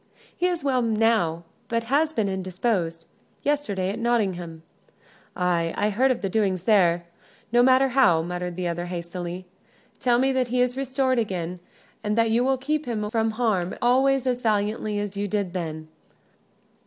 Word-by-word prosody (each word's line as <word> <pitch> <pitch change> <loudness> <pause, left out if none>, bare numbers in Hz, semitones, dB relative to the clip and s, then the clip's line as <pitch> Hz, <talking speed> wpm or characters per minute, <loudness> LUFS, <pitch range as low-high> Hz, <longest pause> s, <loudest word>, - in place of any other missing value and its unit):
"He 360 - +1
is 350 -4 -2
well, 260 -3 +2
now, 220 -7 +1 0.2
but 230 0 -1
has 290 +6 +1
been 220 -9 0
indisposed.... 185 -3 -2 0.4
Yesterday 210 -11 0
at 220 - -5
Nottingham 185 -9 -1 0.4
" - - -30
"Ay, 175 -2 0
I 210 - +1
heard 255 +6 +2
of 255 - -1
the - - +1
doings 190 -3 0
there 175 -5 +3 0.5
no 240 +1 +5
matter 260 +1 +5
how," 180 -11 +4
muttered 180 0 -4
the 180 0 -2
other, 175 +1 -3
hastily. 175 +1 -5 0.5
"Tell 245 -1 +3
me 265 +2 +2
that 260 -2 +1
he 250 +1 -1
is 250 0 +2
restored 260 -1 0
again; 180 -5 -3 0.4
and 210 +1 -1
that 230 -1 +3
you 235 +2 +3
will 265 +1 +2
keep 300 +3 -2
him 210 -3 -2
from 225 -1 +1
harm 200 -7 0
always 265 +2 +3
as 250 -1 0
valiantly 210 -1 0
as 205 -1 -4
you 205 0 -1
did 200 -3 -2
then. 160 -3 -4
215 Hz, 170 wpm, -25 LUFS, 180-250 Hz, 0.5 s, no